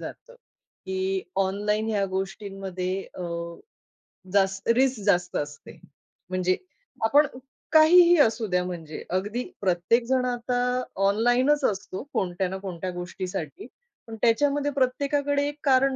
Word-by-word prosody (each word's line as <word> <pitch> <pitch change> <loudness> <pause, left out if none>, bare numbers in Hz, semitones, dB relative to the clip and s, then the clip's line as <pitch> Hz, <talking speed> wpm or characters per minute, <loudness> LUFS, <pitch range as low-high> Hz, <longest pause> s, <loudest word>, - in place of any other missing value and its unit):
जातं - - -10 0.5
की 190 0 -1 0.2
ऑनलाईन 210 +3 -1
ह्या 205 -2 +1
गोष्टींमध्ये 190 -1 -3 0.2
अ, - - -4 1.1
जास्त 195 0 +1
रिस्क 260 -2 +2
जास्त 180 -3 +2
असते. 145 0 -7 0.5
म्हणजे 185 0 +1 0.5
आपण 290 +6 +5 0.4
काहीही 345 +2 +7
असूद्या 220 -8 +2
म्हणजे. 165 -4 -6
अगदी 205 +7 -1 0.2
प्रत्येक 190 +5 +2
जण 255 0 +2
आता 245 0 -1 0.5
ऑनलाईनच 245 +8 +3
असतो 190 0 -6
कोणत्या 185 0 -1
ना 190 - -4
कोणत्या 185 -2 -5
गोष्टीसाठी. 180 - -6 0.4
पण 225 - -7
त्याच्यामध्ये 285 +5 +2
प्रत्येकाकडे 285 +2 0
एक 290 - -4
कारण 270 -1 +3
210 Hz, 115 wpm, -26 LUFS, 185-260 Hz, 1.1 s, काहीही